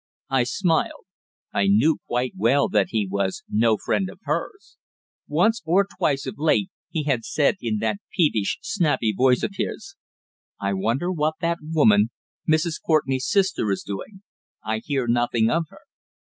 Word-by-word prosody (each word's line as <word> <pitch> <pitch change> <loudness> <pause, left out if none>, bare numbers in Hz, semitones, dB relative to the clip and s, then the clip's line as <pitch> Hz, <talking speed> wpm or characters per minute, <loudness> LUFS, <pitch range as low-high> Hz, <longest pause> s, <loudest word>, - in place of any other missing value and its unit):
I 130 -2 +3
smiled. 165 +5 0 0.5
I 100 - +2
knew 115 +11 +4
quite 125 +1 -1
well 120 +8 +3
that 100 -2 +2
he 110 -3 0
was 95 0 -2
no 110 0 +2
friend 190 - -1
of - - -12
hers. 400 - -4 0.5
Once 200 +10 +2
or 180 +5 +3
twice 140 -2 +1
of - - -6
late 165 +5 +2 0.2
he 160 - -2
had 135 -6 0
said 150 - +1
in 110 -2 -1
that 110 -2 0
peevish 145 - +1
snappy 150 - +1
voice 125 +1 +3
of - - -1
his: 160 -7 -4 0.6
"I 100 0 -1
wonder 115 - 0
what 155 -2 0
that 170 0 0
woman, 115 -10 +3 0.4
Mrs. 155 +1 +1
Courtenay's 135 -5 +1
sister, 190 - +1
is 95 - -1
doing? 190 - -7 0.4
I 110 0 -1
hear 135 +1 -2
nothing 120 -1 +2
of 165 0 +1
her." - - -17
135 Hz, 160 wpm, -23 LUFS, 110-165 Hz, 0.6 s, knew